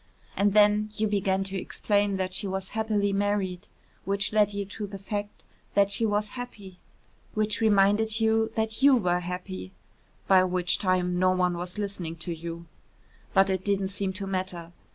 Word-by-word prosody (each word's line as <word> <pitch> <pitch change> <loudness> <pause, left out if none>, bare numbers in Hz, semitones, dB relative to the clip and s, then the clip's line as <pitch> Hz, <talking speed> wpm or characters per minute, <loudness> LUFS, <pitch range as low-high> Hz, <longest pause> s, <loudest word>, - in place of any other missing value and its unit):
And 200 0 +2
then 210 0 +5
you 215 - 0
began 195 -2 +1
to 195 0 -5
explain 205 -1 0
that 185 -1 -2
she 200 - -2
was 190 0 -3
happily 210 -2 0
married, 200 -1 -1 0.4
which 200 +1 -1
led 210 -1 +4
you 200 0 -3
to 205 +1 -6
the 200 0 -7
fact 205 +1 -5 0.3
that 200 0 +4
she 225 +3 +2
was 210 0 0
happy, 205 -7 -9 0.6
which 215 0 0
reminded 215 +1 +3
you 220 0 +2
that 220 +1 -2
you 275 -1 +7
were 180 -6 +1
happy, 175 - -6 0.5
by 190 -1 +6
which 180 -1 +1
time 180 -2 +1
no 185 0 +4
one 180 -1 +1
was 175 +3 -6
listening 195 -5 -4
to 170 +1 -4
you. 170 +1 -7 0.7
But 195 0 +5
it 190 -1 -1
didn't 195 -1 0
seem 195 -1 -2
to 195 +1 -3
matter. 185 -3 -3
195 Hz, 175 wpm, -27 LUFS, 185-210 Hz, 0.7 s, you